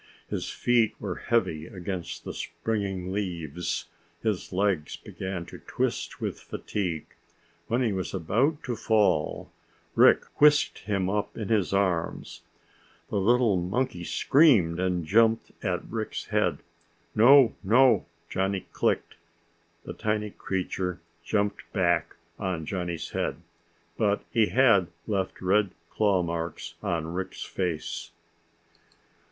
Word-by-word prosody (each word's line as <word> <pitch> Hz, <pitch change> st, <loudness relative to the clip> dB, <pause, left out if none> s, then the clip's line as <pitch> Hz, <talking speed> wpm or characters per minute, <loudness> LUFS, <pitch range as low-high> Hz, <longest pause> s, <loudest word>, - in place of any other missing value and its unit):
His -, -, -2 dB
feet 120 Hz, -3 st, +2 dB
were 95 Hz, -4 st, -4 dB
heavy 80 Hz, -10 st, +1 dB
against 90 Hz, -1 st, -5 dB
the -, -, -5 dB
springing 95 Hz, +1 st, -3 dB
leaves, 90 Hz, -5 st, -3 dB, 0.4 s
his 110 Hz, -5 st, -1 dB
legs 95 Hz, -5 st, 0 dB
began 95 Hz, -2 st, -6 dB
to -, -, -11 dB
twist -, -, -2 dB
with -, -, -3 dB
fatigue. 90 Hz, -6 st, -3 dB, 0.6 s
When 120 Hz, +3 st, +1 dB
he 110 Hz, -4 st, +1 dB
was 95 Hz, -1 st, -3 dB
about 115 Hz, -, 0 dB
to 125 Hz, -4 st, -2 dB
fall, 100 Hz, -8 st, +1 dB, 0.4 s
Rick -, -, +6 dB, 0.2 s
whisked 150 Hz, 0 st, +5 dB
him 100 Hz, -3 st, 0 dB
up 105 Hz, +1 st, -2 dB
in 110 Hz, -4 st, -4 dB
his 105 Hz, -5 st, +2 dB
arms. 95 Hz, -4 st, -1 dB, 0.7 s
The 100 Hz, -, +1 dB
little 115 Hz, 0 st, +3 dB
monkey 90 Hz, +2 st, -1 dB
screamed 110 Hz, -, +4 dB
and 90 Hz, -2 st, 0 dB
jumped 115 Hz, +5 st, +3 dB
at -, -, -1 dB
Rick's -, -, -4 dB
head. -, -, 0 dB, 0.5 s
"No, 125 Hz, +2 st, +7 dB
no!" 115 Hz, 0 st, +5 dB, 0.2 s
Johnny 95 Hz, +1 st, -1 dB
clicked. -, -, 0 dB, 0.7 s
The -, -, -6 dB
tiny 105 Hz, -1 st, -1 dB
creature 90 Hz, -2 st, -3 dB, 0.2 s
jumped 100 Hz, +2 st, -1 dB
back -, -, +1 dB, 0.2 s
on 90 Hz, -5 st, -2 dB
Johnny's 85 Hz, -1 st, -4 dB
head, -, -, -1 dB, 0.6 s
but 105 Hz, -2 st, +2 dB
he 115 Hz, -4 st, +3 dB
had 115 Hz, -9 st, +4 dB, 0.2 s
left 95 Hz, -3 st, -2 dB
red 100 Hz, +2 st, +3 dB, 0.2 s
claw 100 Hz, -4 st, +2 dB
marks 85 Hz, 0 st, -4 dB
on 85 Hz, -4 st, -2 dB
Rick's 95 Hz, +1 st, -4 dB
face. 85 Hz, -2 st, -3 dB
95 Hz, 120 wpm, -27 LUFS, 90-110 Hz, 0.7 s, No